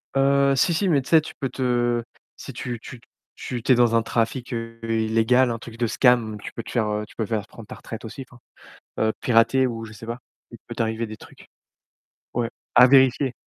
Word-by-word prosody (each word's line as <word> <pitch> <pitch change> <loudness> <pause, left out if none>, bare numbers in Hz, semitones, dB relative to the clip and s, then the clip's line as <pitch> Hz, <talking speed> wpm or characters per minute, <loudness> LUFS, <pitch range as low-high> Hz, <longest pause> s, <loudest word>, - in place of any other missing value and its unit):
Heu, 140 0 +3
si, 165 +6 +2
si, 195 +5 0
mais 145 -5 +3
tu - - -11
sais, 160 -1 +6
tu 155 - -9
peux 135 - -2
te 120 -2 0 0.3
si - - -9
tu 120 -2 -5
tu 120 +2 -11
t - - -27 0.3
tu 120 -2 -5
tu 130 - +1
es - - +4
dans 120 -1 +3
un 115 - +4
trafic 115 +2 -2
heu, 115 0 -6
illégal, 115 +3 +2
un 115 - -4
truc 115 0 -11
de 120 - 0
scam, 115 -2 +2
tu - - -7
peux 115 - -6
te - - -9
faire, 115 -3 0
heu 105 0 -2
tu - - -19
peux 110 - -2
faire 105 -1 -2
prendre 115 -3 -13
ta - - -9
retraite 115 - -9
aussi, 130 +4 -8
enfin, 120 - -17 0.6
heu, 110 0 +2
pirater 120 +2 +3
ou 115 -2 -5
je 110 - -10
sais 110 +1 -11
pas. 120 +1 -5 0.3
Il - - -11
peut - - -7
t'arriver 115 0 -2
des 110 0 -9
trucs. - - -16 0.9
Ouais, 120 -1 -1 0.3
à 125 +1 +9
vérifier 130 0 +4
120 Hz, 230 wpm, -23 LUFS, 115-130 Hz, 0.9 s, à